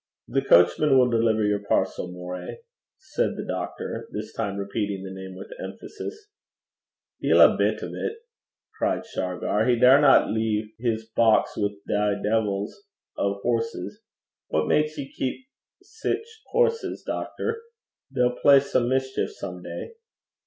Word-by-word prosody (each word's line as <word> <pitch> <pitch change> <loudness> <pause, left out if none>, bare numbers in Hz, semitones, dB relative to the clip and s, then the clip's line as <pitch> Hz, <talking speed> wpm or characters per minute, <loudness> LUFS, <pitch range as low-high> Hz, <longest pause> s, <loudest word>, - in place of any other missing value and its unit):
'The - - +1
coachman 110 - +5
will 125 -1 +5
deliver 115 -1 +2
your 105 -1 +1
parcel, 90 - 0
Moray,' 90 - -7 0.4
said 310 +11 -2
the - - -4
doctor, - - -5
this - - -6
time 100 -3 -3
repeating 100 -1 -3
the 95 - -7
name 95 0 -8
with - - -10
emphasis. 425 -1 -8 0.9
'Deil - - +4
a - - +8
bit - - 0
o' - - -3
't!' - - -4 0.6
cried - - 0
Shargar. 100 - -1
'He 125 - +4
daurna 135 +4 +6
lea' 110 -1 -1
his 115 -2 -1
box 115 -2 +4
wi' 105 0 -1
thae 105 0 +1
deevils 105 -1 0 0.4
o' 100 0 -1
horses. 115 -5 -2 0.5
What 80 0 0
gars 150 0 +2
he 140 - -5
keep 135 - -4 0.4
sic 445 0 -3 0.2
horses, 470 -1 0
doctor? 455 0 -3 0.5
They'll 125 0 +1
play 140 -1 +8
some 125 -3 0
mischeef 130 0 0
some 90 -2 -7
day.' 85 -1 -7
110 Hz, 140 wpm, -25 LUFS, 100-135 Hz, 0.9 s, a